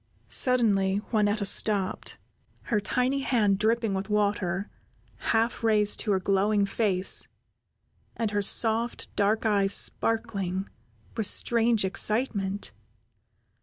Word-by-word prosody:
Suddenly 205 Hz, -6 st, +2 dB
Juanetta 210 Hz, -2 st, 0 dB
stopped, 195 Hz, -1 st, 0 dB, 0.5 s
her 220 Hz, -5 st, -1 dB
tiny 250 Hz, +7 st, -1 dB
hand 210 Hz, -7 st, +1 dB
dripping 225 Hz, 0 st, 0 dB
with 195 Hz, +2 st, -4 dB
water, 200 Hz, -2 st, -1 dB, 0.5 s
half 230 Hz, +1 st, -1 dB
raised 210 Hz, -2 st, +2 dB
to 215 Hz, -, 0 dB
her 190 Hz, -, +1 dB
glowing 200 Hz, +2 st, +1 dB
face, 195 Hz, -2 st, +1 dB, 0.9 s
and 225 Hz, -3 st, -2 dB
her 205 Hz, 0 st, -1 dB
soft, 225 Hz, +3 st, +1 dB
dark 210 Hz, +2 st, 0 dB
eyes 200 Hz, -2 st, +2 dB
sparkling 200 Hz, -5 st, -1 dB, 0.5 s
with 220 Hz, -3 st, +2 dB
strange 230 Hz, -2 st, +2 dB
excitement. 205 Hz, -1 st, 0 dB
210 Hz, 105 wpm, -26 LUFS, 195-225 Hz, 0.9 s, Suddenly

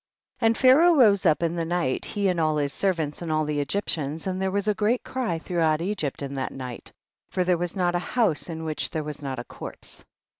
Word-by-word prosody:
44. 230 Hz, -, 0 dB
And 225 Hz, -, +2 dB
Pharaoh 305 Hz, +7 st, +6 dB
rose 205 Hz, -, +5 dB
up 155 Hz, +1 st, +3 dB
in 170 Hz, 0 st, 0 dB
the 170 Hz, -, -1 dB
night, 165 Hz, -5 st, -1 dB
he 205 Hz, -2 st, -1 dB
and 180 Hz, -2 st, +1 dB
all 155 Hz, -1 st, +2 dB
his 145 Hz, -1 st, 0 dB
servants 165 Hz, -7 st, -1 dB
and 165 Hz, -2 st, -3 dB
all 155 Hz, 0 st, +1 dB
tlie 150 Hz, -1 st, -1 dB
Egyptians, 150 Hz, -1 st, -2 dB
and 190 Hz, 0 st, -2 dB
there 190 Hz, -, +1 dB
was 200 Hz, +2 st, -1 dB
a 210 Hz, -, +4 dB
great 220 Hz, +4 st, +1 dB
cry 245 Hz, -10 st, -2 dB
throughout 160 Hz, -2 st, +1 dB
Egypt 170 Hz, -7 st, -2 dB
in 140 Hz, 0 st, -5 dB
that 135 Hz, -1 st, -3 dB
night, 125 Hz, -3 st, -7 dB, 0.4 s
for 185 Hz, -, 0 dB
there 180 Hz, 0 st, +3 dB
was 175 Hz, -1 st, -3 dB
not 175 Hz, -2 st, +1 dB
a 175 Hz, -, +1 dB
house 190 Hz, -5 st, 0 dB
in 160 Hz, -1 st, -5 dB
which 155 Hz, -1 st, -2 dB
there 155 Hz, -2 st, -3 dB
was 150 Hz, 0 st, -7 dB
not 135 Hz, -2 st, -4 dB
a 120 Hz, -, -4 dB
corpse. -, -, -9 dB
170 Hz, 235 wpm, -25 LUFS, 150-200 Hz, 0.4 s, Pharaoh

